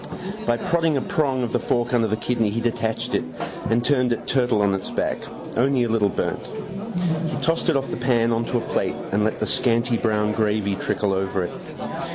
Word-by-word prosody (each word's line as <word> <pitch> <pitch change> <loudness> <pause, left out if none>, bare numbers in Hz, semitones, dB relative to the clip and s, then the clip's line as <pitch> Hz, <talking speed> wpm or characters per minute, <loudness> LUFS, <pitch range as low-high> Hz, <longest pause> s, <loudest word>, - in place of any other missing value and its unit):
By 120 - +3
prodding 165 +1 +1
a - - +1
prong 135 -5 +1
of 120 - -3
the - - +3
fork 120 0 0
under 115 -2 +3
the 110 - +1
kidney 115 -2 +1
he 110 +3 -1
detached 115 -1 -1
it - - +2 0.5
and 120 +1 +2
turned 125 -3 +3
it 120 - -2
turtle 125 -5 +2
on 100 -1 +3
its 95 -1 -3
back. - - -1 0.4
Only 130 +1 +3
a 120 - -1
little 110 -3 +3
burnt. - - -2 0.9
He - - -3
tossed 165 +1 +1
it 165 - +3
off 135 - -3
the - - -2
pan 120 -2 +2
on 115 0 +1
to 120 - 0
a - - 0
plate - - -1 0.2
and 105 +1 +2
let 110 - 0
the - - -1
scanty 115 -1 +2
brown 105 -2 +1
gravy 105 -2 +1
trickle 100 0 0
over 95 -1 0
it. 90 - -3
115 Hz, 210 wpm, -23 LUFS, 105-125 Hz, 0.9 s, By